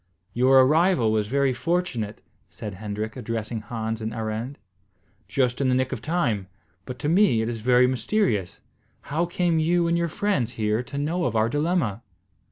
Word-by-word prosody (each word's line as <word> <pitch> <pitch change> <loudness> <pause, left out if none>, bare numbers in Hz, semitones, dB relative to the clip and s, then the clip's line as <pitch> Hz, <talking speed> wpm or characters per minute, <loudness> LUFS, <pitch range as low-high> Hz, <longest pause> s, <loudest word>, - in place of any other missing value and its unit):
"Your 130 +2 +5
arrival 150 - +3
was 105 -1 0
very 135 +2 +1
fortunate," 125 - -2 0.3
said 105 -2 -7
Hendrik, 105 +2 -5
addressing 115 -2 -4
Hans 110 0 -4
and 110 +1 -4
Arend. 110 +4 -4 0.7
"Just 125 +4 0
in 135 - +2
the 125 - +3
nick 130 0 0
of - - -4
time; 125 - -1 0.4
but 125 - -7
to 135 - -3
me 170 - +4
it - - -2
is 115 -1 -4
very 125 +2 +5
mysterious. 120 - 0 0.5
How 170 +3 +1
came 175 -1 +1
you 170 +2 +2
and 170 - +2
your 170 0 +1
friends 150 - -1
here 110 0 0
to 135 +3 -8
know 165 +5 -1
of 115 - -1
our 110 +1 +2
dilemma?" 145 - 0
125 Hz, 175 wpm, -25 LUFS, 110-160 Hz, 0.7 s, Your